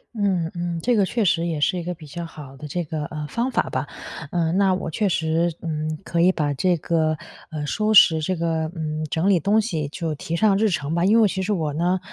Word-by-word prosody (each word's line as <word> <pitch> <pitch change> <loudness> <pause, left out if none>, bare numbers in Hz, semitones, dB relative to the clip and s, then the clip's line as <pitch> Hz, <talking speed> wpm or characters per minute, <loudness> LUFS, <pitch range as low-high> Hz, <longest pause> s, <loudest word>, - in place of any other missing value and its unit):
嗯 185 -6 0
嗯， 175 -1 -3
这 245 0 +3
个 205 -3 +3
确 230 0 0
实 170 -1 +2
也 160 -3 -2
是 180 +4 +1
一 - - -5
个 180 +1 -4
比 160 -1 -13
较 170 +4 -6
好 150 -5 -10
的 150 +3 -8
这 175 +4 -2
个， 155 -1 -4
呃， 150 0 -5
方 235 - -1
法 - - +1
吧。 - - -2 0.4
呃， 165 -2 0
那 190 +1 +3
我 175 -3 -4
确 200 +4 0
实， 165 +1 +1
嗯， 155 -1 -3
可 170 0 0
以 180 - +6
把 150 -5 -1
这 175 +5 +1
个， 155 -1 0 0.3
呃， 150 -2 -4
收 215 +7 0
拾 160 -5 +8
这 185 +4 -1
个 160 -1 -1
嗯， 155 -1 -3
整 165 +5 0
理 195 -3 +4
东 205 +7 +3
西 165 -10 -1
就 160 +1 -3
提 160 +3 -4
上 205 +2 +3
日 220 - +3
程 150 -4 -2
吧。 170 +1 +1
因 210 +5 +5
为 215 - +6
其 190 -1 -2
实 195 +3 -1
我 155 -7 -1
呢， 175 +4 +1
170 Hz, 260 characters per minute, -23 LUFS, 155-185 Hz, 0.4 s, 拾